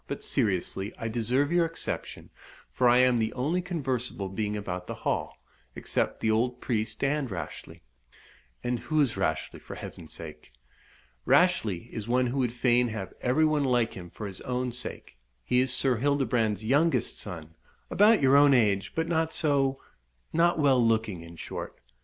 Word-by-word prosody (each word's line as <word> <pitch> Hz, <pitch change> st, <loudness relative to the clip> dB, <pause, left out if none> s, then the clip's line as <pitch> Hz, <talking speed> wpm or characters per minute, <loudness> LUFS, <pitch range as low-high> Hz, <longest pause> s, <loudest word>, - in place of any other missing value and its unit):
But, -, -, -5 dB
seriously, 95 Hz, +1 st, 0 dB
I 115 Hz, -, -4 dB
deserve 125 Hz, +6 st, 0 dB
your 170 Hz, -1 st, +3 dB
exception, 165 Hz, -, -5 dB, 0.4 s
for 125 Hz, -1 st, +3 dB
I 120 Hz, -, +5 dB
am 125 Hz, -1 st, +4 dB
the 110 Hz, -1 st, 0 dB
only 150 Hz, +8 st, 0 dB
conversable 130 Hz, -, -3 dB
being 105 Hz, +2 st, -2 dB
about 90 Hz, -3 st, -5 dB
the -, -, -5 dB
Hall, -, -, -1 dB, 0.4 s
except -, -, -2 dB
the 110 Hz, -, +2 dB
old 120 Hz, +3 st, 0 dB
priest 110 Hz, -1 st, -2 dB
and 140 Hz, -1 st, 0 dB
Rashleigh." 95 Hz, -, -7 dB, 0.8 s
"And 120 Hz, -1 st, -1 dB
who 155 Hz, +5 st, -1 dB
is 135 Hz, -7 st, +2 dB
Rashleigh, 80 Hz, -5 st, -2 dB
for -, -, -9 dB
Heaven's 80 Hz, -2 st, -9 dB
sake?" 75 Hz, -4 st, -10 dB, 0.7 s
"Rashleigh 115 Hz, -, +2 dB
is 110 Hz, -1 st, -6 dB
one 125 Hz, +1 st, +2 dB
who 125 Hz, +3 st, -2 dB
would 125 Hz, -3 st, +1 dB
fain 120 Hz, 0 st, +2 dB
have 110 Hz, -5 st, -5 dB
every 130 Hz, +6 st, +3 dB
one 155 Hz, -2 st, +2 dB
like 120 Hz, -4 st, +1 dB
him 90 Hz, -2 st, -9 dB
for 105 Hz, -, -8 dB
his 95 Hz, -2 st, -2 dB
own 125 Hz, 0 st, -2 dB
sake. 120 Hz, -, -5 dB, 0.2 s
He 125 Hz, -, +2 dB
is 130 Hz, 0 st, +2 dB
Sir 125 Hz, -1 st, +2 dB
Hildebrand's 120 Hz, -5 st, +1 dB
youngest 150 Hz, +8 st, +2 dB
son 80 Hz, -5 st, -7 dB, 0.4 s
about 210 Hz, -5 st, +5 dB
your 135 Hz, +1 st, +5 dB
own 140 Hz, -1 st, +6 dB
age, 100 Hz, -5 st, +2 dB
but 165 Hz, 0 st, 0 dB
not 160 Hz, -1 st, 0 dB
so 140 Hz, -3 st, +1 dB, 0.5 s
not 170 Hz, +1 st, +3 dB
well 135 Hz, -5 st, +4 dB
looking, 110 Hz, -5 st, 0 dB
in 85 Hz, +1 st, -11 dB
short. -, -, -7 dB
125 Hz, 170 wpm, -28 LUFS, 105-140 Hz, 0.8 s, own